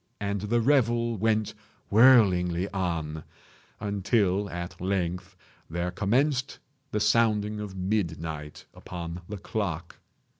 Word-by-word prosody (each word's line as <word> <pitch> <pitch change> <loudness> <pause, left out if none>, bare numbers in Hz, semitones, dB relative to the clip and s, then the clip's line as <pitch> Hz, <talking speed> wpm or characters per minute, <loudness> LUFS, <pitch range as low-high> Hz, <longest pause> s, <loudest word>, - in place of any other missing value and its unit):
And 100 -1 -2
the 115 +3 +1
revel 120 -3 +2
went 110 0 +1 0.4
whirlingly 100 -7 +5
on, 80 -5 -2 0.6
until 100 -1 +1
at 85 -1 -6
length 90 0 -2 0.3
there 85 +2 -2
commenced 125 +8 +1 0.3
the 105 - -1
sounding 105 -1 +2
of 105 -2 -6
midnight 80 -6 -3
upon 85 0 -7
the 105 - -4
clock. 90 -4 -4
100 Hz, 105 wpm, -27 LUFS, 90-110 Hz, 0.6 s, whirlingly